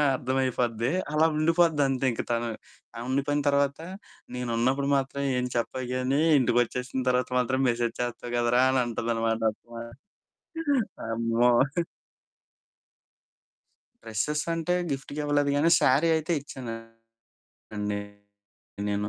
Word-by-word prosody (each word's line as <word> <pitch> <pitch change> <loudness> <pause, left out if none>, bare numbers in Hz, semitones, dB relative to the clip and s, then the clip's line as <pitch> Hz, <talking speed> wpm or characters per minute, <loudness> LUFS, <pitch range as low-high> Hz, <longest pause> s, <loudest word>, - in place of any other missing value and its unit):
అర్థమైపోద్ది 125 -2 0 0.2
అలా 160 +1 +4
ఉండిపోద్ది 165 -1 +3
అంతే 135 0 -1
ఇంక - - -3
తను. 115 0 0 0.5
ఆ! - - -7
ఉండిపోయిన 140 +2 0
తర్వాత 140 +1 +1 0.6
"నేనున్నప్పుడు 125 +3 0
మాత్రం 135 +1 -2 0.2
ఏం 125 - -1
చెప్పవు 125 +2 -2
గాని 130 +3 +1 0.2
ఇంటికొచ్చేసిన 125 +1 0
తర్వాత 125 0 +1
మాత్రం 130 +2 0
మెసేజ్ 120 0 -1
చేస్తావు 120 0 -4
కదరా!" 120 +1 +3
అని 130 -1 +2
అంటుంది 115 0 -2
అనమాట. 115 0 0
అబ్బా! 115 +1 -11 1.2
అమ్మో! 115 +1 +1 2.5
డ్రెసెసంటే 150 +9 -1 0.2
గిఫ్ట్‌గా 140 +2 -5
ఇవ్వలేదు 145 -1 +2
కాని. 165 +4 +3
శారీ 140 +6 +4
అయితే 160 +2 -1
ఇచ్చానండి 115 -3 -10 1.7
నేను. 105 +1 -1
125 Hz, 105 wpm, -27 LUFS, 115-140 Hz, 2.5 s, అలా